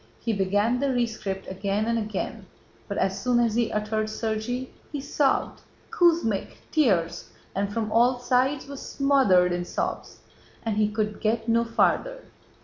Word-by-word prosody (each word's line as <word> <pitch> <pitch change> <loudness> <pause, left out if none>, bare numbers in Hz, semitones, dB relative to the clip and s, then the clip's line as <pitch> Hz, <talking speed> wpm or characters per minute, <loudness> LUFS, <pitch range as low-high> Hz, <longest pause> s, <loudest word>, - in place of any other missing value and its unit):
He 230 - -1
began 205 +5 +1
the 275 0 +1
rescript 215 -6 -2
again 195 +2 -1
and 230 0 +1
again, 210 -3 -4 0.4
but - - -4
as 190 0 0
soon 245 -1 +2
as 235 -2 +2
he 235 0 +1
uttered 215 +1 -1
'Sergéy' 225 +4 -3 0.2
he 295 - -3
sobbed, 280 0 0 0.3
'Kuz 340 -2 +4
mí 210 -4 -1
ch,' - - -20
tears, 195 - +1 0.3
and 200 +1 -1
'From 215 0 -2
all 245 +3 +4
sides' 255 +3 +1
was 280 -1 -8
smothered 260 -11 +3
in 175 0 -1
sobs - - -4 0.4
and 220 -2 -1
he 210 -1 +3
could 210 0 -2
get 225 +1 0
no 230 0 +3
farther. - - +1
225 Hz, 160 wpm, -26 LUFS, 210-250 Hz, 0.4 s, Kuz